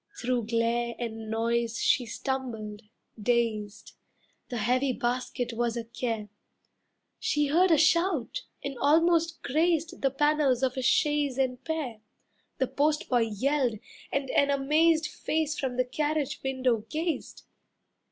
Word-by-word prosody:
Through 245 Hz, -2 st, -1 dB
glare 235 Hz, +1 st, 0 dB
and 225 Hz, -2 st, -5 dB
noise 230 Hz, +1 st, 0 dB
she 245 Hz, -, +2 dB
stumbled, 225 Hz, -5 st, -4 dB, 0.4 s
dazed. 220 Hz, -3 st, -1 dB, 0.6 s
The 245 Hz, -, -3 dB
heavy 250 Hz, +4 st, +1 dB
basket 245 Hz, 0 st, -2 dB
was 235 Hz, 0 st, -1 dB
a 235 Hz, -, -2 dB
care. 225 Hz, -2 st, -4 dB, 0.9 s
She 295 Hz, 0 st, +1 dB
heard 355 Hz, +5 st, +4 dB
a 325 Hz, -, +5 dB
shout 335 Hz, -, +2 dB, 0.2 s
and 275 Hz, -3 st, -5 dB
almost 330 Hz, +3 st, +3 dB
grazed 330 Hz, +3 st, 0 dB
The 270 Hz, -, +3 dB
panels 280 Hz, -2 st, +2 dB
of 260 Hz, 0 st, +1 dB
a 260 Hz, -, -2 dB
chaise 295 Hz, 0 st, +2 dB
and 260 Hz, -1 st, -1 dB
pair. 300 Hz, -9 st, -3 dB, 0.6 s
The 260 Hz, -, +2 dB
postboy 280 Hz, -4 st, +1 dB
yelled, 255 Hz, +1 st, +1 dB, 0.3 s
and 275 Hz, -1 st, -1 dB
an 280 Hz, -, +3 dB
amazed 305 Hz, +4 st, +3 dB
Face 310 Hz, -1 st, -2 dB
from 255 Hz, -2 st, -2 dB
the 255 Hz, -, +2 dB
carriage 295 Hz, +2 st, -1 dB
window 260 Hz, -3 st, +1 dB
gazed. 320 Hz, +1 st, -3 dB
260 Hz, 130 wpm, -28 LUFS, 235-300 Hz, 0.9 s, a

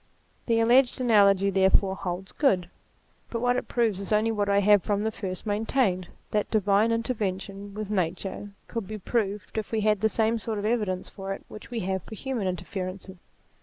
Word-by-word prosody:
The 230 Hz, -1 st, +3 dB
alleged 245 Hz, +3 st, +4 dB
analogy 200 Hz, -5 st, +4 dB
therefore 190 Hz, 0 st, +3 dB
holds 190 Hz, 0 st, -5 dB
good: 185 Hz, -, +1 dB, 0.6 s
but 230 Hz, -, -3 dB
what 245 Hz, +1 st, +2 dB
it -, -, -2 dB
proves 225 Hz, -5 st, +1 dB
is 200 Hz, -, -5 dB
only 215 Hz, +1 st, +3 dB
what 205 Hz, -2 st, 0 dB
I 200 Hz, -, +3 dB
have 205 Hz, 0 st, +5 dB
from 205 Hz, +1 st, -1 dB
the 220 Hz, -, 0 dB
first 185 Hz, -3 st, -5 dB
maintained 205 Hz, -3 st, +1 dB, 0.2 s
that 210 Hz, -1 st, 0 dB
divine 210 Hz, +1 st, +3 dB
interference 220 Hz, -5 st, -1 dB
with 200 Hz, +1 st, -7 dB
nature 195 Hz, +2 st, -2 dB, 0.2 s
could 230 Hz, -5 st, -4 dB
be 215 Hz, -, -5 dB
proved 210 Hz, 0 st, -2 dB
if 215 Hz, -, -6 dB
we 220 Hz, -1 st, 0 dB
had 210 Hz, -2 st, +2 dB
the 220 Hz, -, +3 dB
same 225 Hz, +1 st, +1 dB
sort 220 Hz, 0 st, -3 dB
of 205 Hz, -, -3 dB
evidence 210 Hz, -5 st, 0 dB
for 195 Hz, -1 st, -5 dB
it -, -, -10 dB
which 215 Hz, -, -10 dB
we 235 Hz, -2 st, -3 dB
have 190 Hz, 0 st, -1 dB
for 220 Hz, -, -10 dB
human 240 Hz, -4 st, -3 dB
interferences. 185 Hz, +1 st, -5 dB
205 Hz, 190 wpm, -27 LUFS, 195-225 Hz, 0.6 s, have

